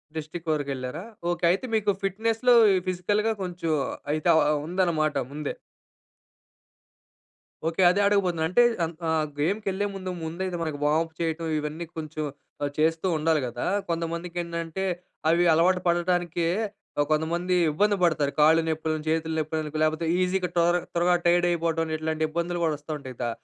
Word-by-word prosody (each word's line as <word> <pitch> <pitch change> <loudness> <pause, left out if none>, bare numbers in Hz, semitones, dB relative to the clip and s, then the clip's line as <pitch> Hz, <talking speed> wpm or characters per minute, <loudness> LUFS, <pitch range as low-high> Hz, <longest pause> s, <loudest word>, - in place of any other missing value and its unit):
District 160 +2 -5
వరకెళ్లారా? 140 +1 -3 0.3
Okay. 175 0 -2
అయితే 195 +7 -1
మీకు 210 -2 +2
ఫిట్‌నెస్‌లో, 225 +5 +2 0.2
ఈ - - +3
ఫిజికల్‌గా 205 +5 +1
కొంచెం 175 -2 -3 0.4
అయితే 155 +2 0
ఆహ్, 150 -1 +3
ఉందనమాట 165 -4 +1 0.2
ముందే. 150 0 -4 2.1
ఓకే. 165 +3 0
అదే 190 - 0
అడగబోతున్నా. 185 -5 +1
అంటే 215 +8 +4 0.2
అన్ 165 +1 -2
ఆహ్, 160 -1 +1
గేమ్‌కెళ్ళే 195 +4 0
ముందు 185 -1 -5
ముందయితే 175 +3 -3
మనకి 155 -3 -3
వార్మ్అప్ 160 +2 +1
చేయటం 165 0 -2
ఇవన్నీ 150 +3 -4
కొంచెం 155 -1 -4 0.4
ఆహ్, 145 - -1
చేస్తూ 160 +3 +1
ఉండాలి 155 0 +2
గదా! 120 0 -4 0.2
కొంతమందికేంటంటే 170 +1 -3 0.5
అవి 170 +2 +4
అలవాటు 180 +3 +3
పడటానికే 175 -1 +1 0.6
కొంతమంది 170 +4 +1 0.2
ఇబ్బంది 205 +7 +2
పడతారు. 155 -4 +2
కాళ్ళు 160 +2 +6
నొప్పులని, 155 -1 -2
చేతులు 160 0 0
నొప్పులని 155 0 -3
లేపోతే 155 +1 0 0.2
ఈజీగా 185 0 0
టోర 170 0 +3 0.2
త్వరగా 175 +1 +3
టైర్డ్ 175 0 +4
అయిపోవటమని 165 -1 0
ఇట్లాంటి 160 0 -2
ఇబ్బందులు 170 +2 -2
గూడా 160 -2 +2
వస్తా 150 +2 -9
ఉంటాయి. 130 -3 -9
దా 120 - 0
165 Hz, 140 wpm, -26 LUFS, 155-180 Hz, 2.1 s, కాళ్ళు